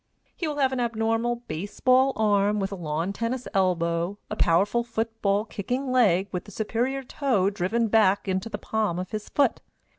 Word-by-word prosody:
He 335 Hz, -, -3 dB
will 300 Hz, -, -2 dB
have 265 Hz, -2 st, +2 dB
an 260 Hz, -, -2 dB
abnormal 235 Hz, +1 st, 0 dB
base 195 Hz, +6 st, -6 dB
ball 260 Hz, +1 st, +4 dB
arm 210 Hz, -1 st, +2 dB
with 195 Hz, 0 st, -2 dB
a -, -, -3 dB
lawn 165 Hz, +2 st, -2 dB
tennis 235 Hz, +4 st, -3 dB
elbow, 175 Hz, -1 st, +1 dB
a -, -, -1 dB
powerful 200 Hz, +8 st, +2 dB
foot 225 Hz, -1 st, -4 dB
ball 200 Hz, +1 st, +2 dB
kicking 250 Hz, +6 st, -3 dB
leg 200 Hz, -7 st, +3 dB
with 180 Hz, -2 st, -4 dB
the 205 Hz, -, -12 dB
superior 245 Hz, +6 st, -1 dB
toe 245 Hz, -8 st, 0 dB
driven 210 Hz, +5 st, 0 dB
back 205 Hz, -2 st, +3 dB
into 190 Hz, +4 st, -1 dB
the 205 Hz, -, -4 dB
palm 210 Hz, -4 st, -1 dB
of 185 Hz, 0 st, -5 dB
his 215 Hz, -1 st, -5 dB
foot. 280 Hz, -4 st, +1 dB
215 Hz, 185 wpm, -26 LUFS, 190-240 Hz, -, ball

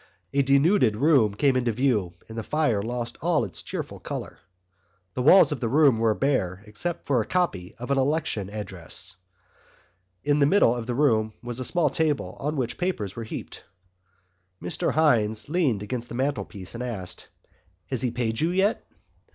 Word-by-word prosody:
A 140 Hz, -, +3 dB
denuded 140 Hz, -, +3 dB
room 125 Hz, -5 st, +3 dB
came 135 Hz, +3 st, +2 dB
into 125 Hz, -2 st, +1 dB
view 110 Hz, -8 st, 0 dB
and 110 Hz, -, -10 dB
the 115 Hz, -, -2 dB
fire 120 Hz, -4 st, 0 dB
lost 120 Hz, +1 st, -4 dB
all 165 Hz, -1 st, +2 dB
its -, -, -8 dB
cheerful -, -, -6 dB
colour. -, -, -6 dB, 0.7 s
The 125 Hz, -, -2 dB
walls 165 Hz, +6 st, +7 dB
of 150 Hz, -, -2 dB
the 115 Hz, -, -1 dB
room 140 Hz, -4 st, +4 dB
were 110 Hz, -2 st, +2 dB
bare 100 Hz, -9 st, 0 dB
except 115 Hz, +12 st, -4 dB
for 130 Hz, -4 st, +2 dB
a -, -, -4 dB
copy 170 Hz, -, -1 dB
of 125 Hz, +3 st, -6 dB
an 140 Hz, -, +3 dB
election 135 Hz, -8 st, 0 dB
address. 95 Hz, -2 st, -6 dB, 1.1 s
In 145 Hz, 0 st, +2 dB
the 140 Hz, -, +5 dB
middle 145 Hz, -, +4 dB
of 120 Hz, -1 st, -5 dB
the 120 Hz, -, -2 dB
room 110 Hz, -6 st, +2 dB
was 120 Hz, 0 st, -4 dB
a -, -, -2 dB
small 155 Hz, +1 st, +2 dB
table 155 Hz, -3 st, -1 dB
on 150 Hz, +2 st, -2 dB
which 125 Hz, -4 st, -3 dB
papers 115 Hz, -, -2 dB
were 115 Hz, -, -5 dB
heaped. -, -, -7 dB, 1.0 s
Mr 90 Hz, -, -2 dB
Hynes 115 Hz, -8 st, +2 dB
leaned 145 Hz, -, +1 dB
against 120 Hz, +2 st, -4 dB
the -, -, -6 dB
mantelpiece 125 Hz, -8 st, -3 dB
and 120 Hz, -, -6 dB
asked: 110 Hz, -8 st, -5 dB, 0.6 s
"Has 130 Hz, -4 st, +1 dB
he 125 Hz, -, +1 dB
paid 115 Hz, -1 st, -2 dB
you 160 Hz, -, +2 dB
yet?" 190 Hz, +4 st, +1 dB
125 Hz, 175 wpm, -25 LUFS, 110-145 Hz, 1.1 s, walls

